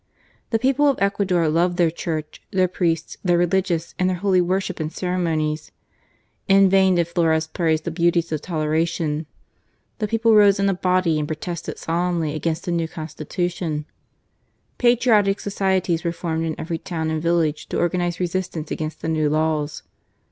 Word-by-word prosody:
The 225 Hz, -, +2 dB
people 270 Hz, +5 st, +2 dB
of 275 Hz, -, +2 dB
Ecuador 195 Hz, -4 st, +1 dB
loved 175 Hz, +3 st, +1 dB
their 170 Hz, -3 st, +3 dB
Church, 155 Hz, -2 st, -5 dB
their 185 Hz, -1 st, +2 dB
priests, 170 Hz, -3 st, -1 dB
their 175 Hz, -2 st, +3 dB
religious, 175 Hz, -1 st, 0 dB
and 185 Hz, 0 st, +2 dB
their 185 Hz, -, -1 dB
holy 185 Hz, -1 st, +2 dB
worship 185 Hz, +1 st, -1 dB
and 155 Hz, 0 st, -3 dB
cere 180 Hz, +1 st, -3 dB
monies. 155 Hz, -3 st, -1 dB, 0.8 s
In 195 Hz, -1 st, +5 dB
vain 190 Hz, -1 st, +4 dB
did 170 Hz, -1 st, +2 dB
Flores 165 Hz, -2 st, +1 dB
praise 160 Hz, -1 st, 0 dB
the 170 Hz, -, -4 dB
beauties 170 Hz, 0 st, +1 dB
of 155 Hz, -, -2 dB
toleration. 160 Hz, -1 st, -1 dB, 0.7 s
The 215 Hz, -, 0 dB
people 225 Hz, +1 st, +2 dB
rose 205 Hz, -2 st, +6 dB
in 200 Hz, -, +2 dB
a -, -, +2 dB
body 180 Hz, -3 st, +1 dB
and 150 Hz, -, -2 dB
protested 160 Hz, +2 st, -5 dB
solemnly 170 Hz, -2 st, -1 dB
against 160 Hz, +2 st, -2 dB
the 175 Hz, -, -2 dB
new 165 Hz, -1 st, 0 dB
Constitution. 160 Hz, 0 st, -4 dB, 0.9 s
Patriotic 230 Hz, -5 st, +4 dB
FLORES, 205 Hz, 0 st, -6 dB
21 190 Hz, -1 st, +2 dB
societies 170 Hz, -2 st, -2 dB
were 170 Hz, -, 0 dB
formed 165 Hz, -1 st, -2 dB
in 160 Hz, -, -4 dB
every 165 Hz, 0 st, -3 dB
town 160 Hz, -3 st, -3 dB
and 160 Hz, -1 st, -1 dB
village 165 Hz, -2 st, 0 dB
to -, -, -2 dB
organize 175 Hz, 0 st, 0 dB
resistance 175 Hz, -3 st, -3 dB
against 155 Hz, 0 st, -4 dB
the -, -, -2 dB
new 155 Hz, -2 st, +1 dB
laws. 155 Hz, -1 st, -1 dB
170 Hz, 170 wpm, -22 LUFS, 160-185 Hz, 0.9 s, rose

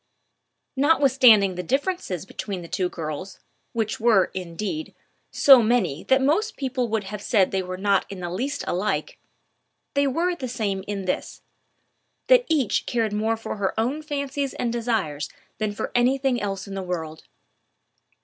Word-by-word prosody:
Notwithstanding 260 Hz, -, +5 dB
the 180 Hz, -, -4 dB
differences 270 Hz, -, -2 dB
between 195 Hz, -2 st, -5 dB
the -, -, -9 dB
two 180 Hz, +1 st, -1 dB
girls, 165 Hz, +3 st, -6 dB, 0.3 s
which 220 Hz, -2 st, -2 dB
were, 220 Hz, -5 st, +4 dB
indeed, 190 Hz, -, -5 dB, 0.3 s
so 270 Hz, -3 st, +7 dB
many 215 Hz, -, +1 dB
that 265 Hz, 0 st, +3 dB
most 375 Hz, +11 st, +1 dB
people 260 Hz, -3 st, -1 dB
would 220 Hz, -1 st, -1 dB
have 200 Hz, +1 st, -7 dB
said 200 Hz, -3 st, +2 dB
they 190 Hz, -, 0 dB
were 185 Hz, 0 st, -5 dB
not 200 Hz, 0 st, +1 dB
in 195 Hz, -, -7 dB
the 175 Hz, -1 st, -4 dB
least 270 Hz, +10 st, -3 dB
alike, 210 Hz, -, -2 dB, 0.7 s
they 280 Hz, 0 st, +2 dB
were 340 Hz, +6 st, 0 dB
the 265 Hz, -6 st, -5 dB
same 210 Hz, -6 st, -2 dB
in 200 Hz, -2 st, -3 dB
this, 185 Hz, -, -3 dB, 0.9 s
that -, -, +6 dB
each 290 Hz, -8 st, +1 dB
cared 225 Hz, -3 st, 0 dB
more 220 Hz, +2 st, 0 dB
for 225 Hz, -, -6 dB
her 200 Hz, +2 st, -1 dB
own 260 Hz, +7 st, 0 dB
fancies 280 Hz, -2 st, -3 dB
and 235 Hz, -1 st, -2 dB
desires 205 Hz, -12 st, -1 dB, 0.3 s
than 215 Hz, -1 st, 0 dB
for 205 Hz, -, -4 dB
any 245 Hz, +2 st, +3 dB
thing 265 Hz, -3 st, 0 dB
else 195 Hz, -2 st, -3 dB
in 200 Hz, -, -7 dB
the 195 Hz, -, -3 dB
world. 165 Hz, -4 st, -5 dB
220 Hz, 160 wpm, -24 LUFS, 190-270 Hz, 0.9 s, so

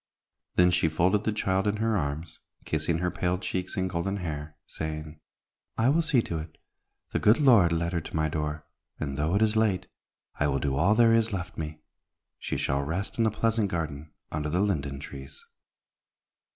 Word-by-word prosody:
Then 90 Hz, 0 st, +5 dB
she 85 Hz, -2 st, +2 dB
folded 90 Hz, +6 st, +2 dB
the 110 Hz, -, +2 dB
child 95 Hz, -2 st, 0 dB
in 105 Hz, -, +1 dB
her 110 Hz, 0 st, +1 dB
arms, 80 Hz, -1 st, -3 dB, 0.3 s
kissing 80 Hz, +1 st, 0 dB
her 90 Hz, +1 st, -1 dB
pale 90 Hz, 0 st, 0 dB
cheeks 90 Hz, +1 st, -4 dB
and 95 Hz, 0 st, +1 dB
golden 90 Hz, +3 st, -2 dB
hair, 75 Hz, -4 st, -5 dB
saying, 75 Hz, 0 st, -6 dB, 0.6 s
"I 115 Hz, +3 st, +3 dB
will 160 Hz, +4 st, +4 dB
see 145 Hz, -7 st, +2 dB
to 85 Hz, -, -3 dB
it. 80 Hz, 0 st, -9 dB, 0.5 s
The -, -, 0 dB
good 110 Hz, +6 st, +5 dB
Lord 115 Hz, -, +6 dB
led 85 Hz, +1 st, 0 dB
her 85 Hz, -, 0 dB
to -, -, -8 dB
my 80 Hz, -1 st, +2 dB
door, 75 Hz, -1 st, -3 dB, 0.3 s
and, 70 Hz, -3 st, -3 dB
though 75 Hz, +6 st, 0 dB
it 105 Hz, -, +4 dB
is 110 Hz, 0 st, +2 dB
late, 110 Hz, -5 st, +2 dB, 0.5 s
I 75 Hz, -, +3 dB
will 70 Hz, -1 st, +1 dB
do 70 Hz, 0 st, -1 dB
all 90 Hz, +10 st, +3 dB
there 115 Hz, 0 st, +6 dB
is 115 Hz, 0 st, +3 dB
left 95 Hz, -2 st, -4 dB
me. 75 Hz, -1 st, -5 dB, 0.6 s
She -, -, -3 dB
shall 70 Hz, +1 st, 0 dB
rest 85 Hz, +11 st, -3 dB
in -, -, +5 dB
the -, -, +4 dB
pleasant 110 Hz, -1 st, +1 dB
garden 80 Hz, -3 st, -4 dB, 0.2 s
under 75 Hz, 0 st, -2 dB
the 90 Hz, +5 st, +1 dB
linden 70 Hz, -9 st, -1 dB
trees." 70 Hz, -1 st, -10 dB
85 Hz, 190 wpm, -28 LUFS, 75-105 Hz, 0.6 s, Lord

